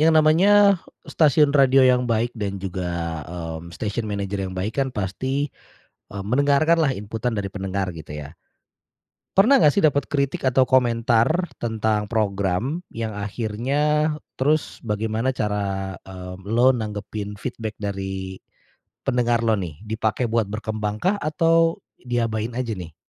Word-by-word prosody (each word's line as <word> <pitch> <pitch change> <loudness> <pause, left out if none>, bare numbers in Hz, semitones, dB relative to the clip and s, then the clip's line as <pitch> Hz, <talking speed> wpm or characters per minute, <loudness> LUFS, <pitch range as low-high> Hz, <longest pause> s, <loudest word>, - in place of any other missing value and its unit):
yang 160 +1 +5
namanya 195 +5 +5 0.3
stasiun 150 -2 +3
radio 135 -2 +6
yang 125 0 +4
baik 115 +2 0
dan 100 -4 -3
juga, 85 -4 -3
mmm, 85 -1 -6
station 105 +6 -3
manager 100 -1 -3
yang 95 - -8
baik 100 +5 -2
kan 135 - -2
pasti, 130 +7 -2 0.7
eee, 100 -1 -5
mendengarkanlah 145 +5 +3
inputan 110 +4 -3
dari 100 - -2
pendengar 95 -1 -3
gitu 80 -2 -9
ya, 75 +1 -8 1.0
Pernah 225 +3 +6
nggak 150 - +7
sih 145 - -2
dapat 145 -5 +2
kritik 140 -2 0
atau 130 0 +3
komentar 120 +6 +2 0.2
tentang 110 -2 0
program 105 - 0
yang 110 -2 -4
akhirnya 125 +9 0 0.2
terus 150 +3 0
bagaimana 110 +3 -1
cara, 100 -5 -2
eee, 90 -1 -8 0.2
elo 125 +3 +5
nanggepin 105 -2 -5
feedback 110 -2 -5
dari 95 -2 -5 0.6
pendengar 120 -1 +1
lo 115 - +3
nih, 90 -8 -3
dipakai 110 +2 -1
buat 115 -3 0
berkembangkah 110 - -2
atau 165 +2 +2 0.2
diabain 115 -2 -1
aja 120 -3 -2
nih? 85 -5 -8
110 Hz, 135 wpm, -23 LUFS, 100-135 Hz, 1.0 s, nggak